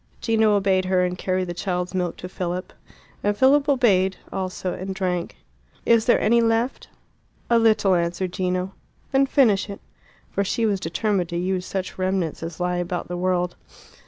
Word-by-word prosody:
Gino 220 Hz, -2 st, +3 dB
obeyed 190 Hz, -2 st, +2 dB
her, 185 Hz, -1 st, +2 dB
and 180 Hz, 0 st, -2 dB
carried 185 Hz, 0 st, -1 dB
the 175 Hz, -, -4 dB
child's 180 Hz, 0 st, -3 dB
milk 180 Hz, -2 st, -2 dB
to 180 Hz, -, -7 dB
Philip. 180 Hz, 0 st, -4 dB, 0.5 s
And 205 Hz, 0 st, +1 dB
Philip 280 Hz, +4 st, +4 dB
obeyed 195 Hz, -8 st, +3 dB, 0.2 s
also 185 Hz, -1 st, -3 dB
and 190 Hz, +1 st, -5 dB
drank. 180 Hz, -2 st, -2 dB, 0.5 s
"Is 230 Hz, -1 st, +4 dB
there 240 Hz, -, +4 dB
any 235 Hz, +2 st, +3 dB
left?" 230 Hz, +2 st, 0 dB, 0.6 s
"A 235 Hz, -, +6 dB
little," 215 Hz, -4 st, +4 dB
answered 175 Hz, +1 st, -1 dB
Gino. 185 Hz, 0 st, -1 dB, 0.4 s
"Then 270 Hz, 0 st, +3 dB
finish 220 Hz, -8 st, +3 dB
it." 200 Hz, -, -7 dB, 0.5 s
For 200 Hz, -, 0 dB
she 225 Hz, +4 st, 0 dB
was 205 Hz, -3 st, +1 dB
determined 185 Hz, +1 st, -1 dB
to 170 Hz, -, -3 dB
use 185 Hz, +1 st, -1 dB
such 190 Hz, -1 st, -4 dB
remnants 185 Hz, -4 st, -1 dB
as 165 Hz, +1 st, -6 dB
lie 180 Hz, 0 st, 0 dB
about 175 Hz, 0 st, -3 dB
the 175 Hz, -, -3 dB
world. 180 Hz, -1 st, 0 dB
185 Hz, 170 wpm, -23 LUFS, 180-215 Hz, 0.6 s, A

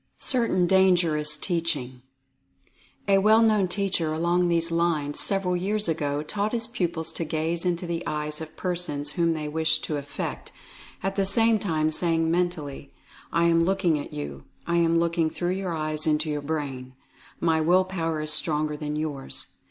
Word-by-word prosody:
CERTAIN 230 Hz, -8 st, +1 dB
DANGEROUS 175 Hz, -5 st, +3 dB
TEACHING. 150 Hz, -8 st, -1 dB, 1.1 s
A 195 Hz, -1 st, +5 dB
well 215 Hz, +3 st, +5 dB
known 215 Hz, -4 st, +3 dB
teacher 180 Hz, -3 st, -1 dB
along 170 Hz, +3 st, +1 dB
these 170 Hz, -1 st, +2 dB
lines 165 Hz, -4 st, 0 dB
several 195 Hz, -2 st, 0 dB
years 205 Hz, +3 st, -1 dB
ago, 150 Hz, -3 st, -1 dB
taught 205 Hz, +7 st, -2 dB
his 230 Hz, -1 st, 0 dB
pupils 170 Hz, -8 st, -3 dB
to -, -, -3 dB
gaze 165 Hz, +3 st, 0 dB
into 175 Hz, 0 st, -1 dB
the 170 Hz, -1 st, -3 dB
eyes 150 Hz, 0 st, -2 dB
of 160 Hz, 0 st, -9 dB
persons 170 Hz, -5 st, -2 dB
whom 170 Hz, 0 st, +1 dB
they 155 Hz, -1 st, -4 dB
wished 160 Hz, +1 st, +1 dB
to 150 Hz, -, -2 dB
affect, 140 Hz, 0 st, -6 dB, 0.5 s
at 195 Hz, 0 st, -1 dB
the 195 Hz, -, +1 dB
same 225 Hz, +2 st, +5 dB
time 155 Hz, -5 st, 0 dB
saying 165 Hz, 0 st, +1 dB
mentally: 165 Hz, -6 st, -2 dB, 0.4 s
"I 170 Hz, -, +2 dB
am 165 Hz, 0 st, +4 dB
looking 180 Hz, -4 st, +1 dB
at 145 Hz, -, -7 dB
you. 70 Hz, -2 st, -7 dB, 0.2 s
I 170 Hz, 0 st, 0 dB
am 165 Hz, 0 st, +3 dB
looking 170 Hz, -1 st, +1 dB
through 175 Hz, +2 st, -2 dB
your 185 Hz, -2 st, -2 dB
eyes 155 Hz, 0 st, 0 dB
into 155 Hz, 0 st, +1 dB
your 150 Hz, -1 st, -2 dB
brain. 140 Hz, -4 st, -4 dB, 0.4 s
My 160 Hz, -1 st, +2 dB
will 180 Hz, +4 st, +4 dB
power 165 Hz, -4 st, -2 dB
is 155 Hz, 0 st, 0 dB
stronger 150 Hz, -1 st, 0 dB
than 150 Hz, 0 st, -4 dB
yours. 150 Hz, -3 st, -3 dB
165 Hz, 165 wpm, -25 LUFS, 155-180 Hz, 1.1 s, A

